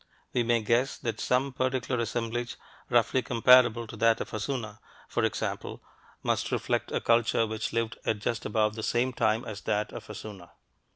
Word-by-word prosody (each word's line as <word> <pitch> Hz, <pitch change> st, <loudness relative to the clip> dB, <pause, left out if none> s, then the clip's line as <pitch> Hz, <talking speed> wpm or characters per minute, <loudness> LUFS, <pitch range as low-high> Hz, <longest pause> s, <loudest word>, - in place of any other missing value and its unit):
We 125 Hz, -, +2 dB
may 120 Hz, -1 st, +2 dB
guess 120 Hz, +5 st, +1 dB
that 115 Hz, -2 st, -4 dB
some 130 Hz, +2 st, +1 dB
particular 130 Hz, -1 st, -1 dB
assemblage, 115 Hz, +1 st, -2 dB, 0.3 s
roughly 120 Hz, +2 st, +3 dB
comparable 120 Hz, -1 st, +5 dB
to 115 Hz, -, -9 dB
that 115 Hz, +1 st, +3 dB
of -, -, -5 dB
Hassuna, 110 Hz, -1 st, -4 dB, 0.3 s
for -, -, -1 dB
example, -, -, -3 dB, 0.4 s
must -, -, 0 dB
reflect -, -, -1 dB
a -, -, 0 dB
culture 115 Hz, -1 st, +3 dB
which 110 Hz, 0 st, -3 dB
lived 115 Hz, 0 st, -2 dB
at 110 Hz, -, 0 dB
just 110 Hz, +2 st, -2 dB
about 110 Hz, -1 st, +1 dB
the 110 Hz, -, -6 dB
same 125 Hz, +3 st, 0 dB
time 110 Hz, 0 st, +1 dB
as 105 Hz, -2 st, -6 dB
that 105 Hz, +1 st, -1 dB
of -, -, -8 dB
Hassuna. 95 Hz, -5 st, -9 dB
115 Hz, 170 wpm, -28 LUFS, 110-120 Hz, 0.4 s, comparable